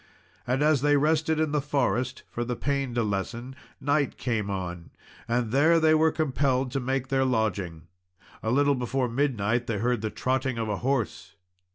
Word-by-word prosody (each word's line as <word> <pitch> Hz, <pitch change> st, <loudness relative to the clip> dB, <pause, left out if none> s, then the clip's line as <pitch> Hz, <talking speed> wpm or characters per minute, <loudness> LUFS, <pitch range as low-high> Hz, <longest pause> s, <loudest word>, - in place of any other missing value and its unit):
And 130 Hz, +4 st, +1 dB
as 150 Hz, -3 st, +3 dB
they 145 Hz, 0 st, +4 dB
rested 155 Hz, +1 st, +2 dB
in 155 Hz, -2 st, +1 dB
the 150 Hz, -1 st, +1 dB
forest 130 Hz, -3 st, -1 dB
for 120 Hz, -, -2 dB
the 120 Hz, 0 st, -3 dB
pain 140 Hz, -1 st, -2 dB
to 120 Hz, -, +2 dB
lessen, 115 Hz, +5 st, -3 dB, 0.2 s
night 145 Hz, +1 st, 0 dB
came 110 Hz, -5 st, -1 dB
on, 90 Hz, -3 st, -5 dB, 0.4 s
and 120 Hz, -1 st, 0 dB
there 155 Hz, +6 st, +4 dB
they 160 Hz, -1 st, +4 dB
were 160 Hz, 0 st, +4 dB
compelled 135 Hz, -4 st, 0 dB
to 135 Hz, -, -1 dB
make 130 Hz, 0 st, -2 dB
their 135 Hz, -1 st, +2 dB
lodging. 100 Hz, -10 st, -1 dB, 0.6 s
A 110 Hz, -, -2 dB
little 140 Hz, +4 st, +3 dB
before 125 Hz, 0 st, -1 dB
midnight 120 Hz, -2 st, 0 dB
they 115 Hz, -, -1 dB
heard 120 Hz, +1 st, 0 dB
the 110 Hz, -, -2 dB
trotting 130 Hz, +1 st, -1 dB
of 115 Hz, -1 st, -2 dB
a 105 Hz, -, -1 dB
horse. 130 Hz, -3 st, -2 dB
130 Hz, 180 wpm, -27 LUFS, 115-140 Hz, 0.6 s, they